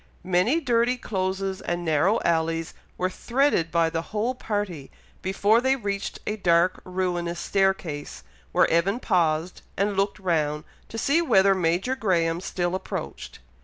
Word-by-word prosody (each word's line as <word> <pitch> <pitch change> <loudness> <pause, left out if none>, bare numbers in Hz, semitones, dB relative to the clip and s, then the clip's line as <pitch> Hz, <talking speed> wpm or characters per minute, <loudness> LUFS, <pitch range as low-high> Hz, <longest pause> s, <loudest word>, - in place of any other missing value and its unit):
Many 185 - +2
dirty 245 -3 +1
closes 190 -3 -2
and 175 0 -3
narrow 160 +7 +2
alleys 165 -1 0 0.2
were 185 0 -1
threaded 240 - +1
by 165 0 +2
the 165 -1 -1
whole 215 +7 -2
party, 205 - -4 0.3
before 200 +4 +2
they 265 +1 +3
reached 200 -5 -3
a 210 - -2
dark 175 -2 +2
ruinous 175 -2 -2
staircase, 190 -8 -1 0.3
where - - +4
Evan 185 +7 +2
paused 165 -4 0 0.2
and 200 +1 +1
looked 195 +1 0
round, 155 -6 0 0.3
to 225 - -7
see 285 +8 +2
whether 195 - +4
Major 185 +7 0
Graham 170 -7 +1
still 175 -2 -2
approached. 185 - -5
185 Hz, 140 wpm, -25 LUFS, 170-210 Hz, 0.3 s, where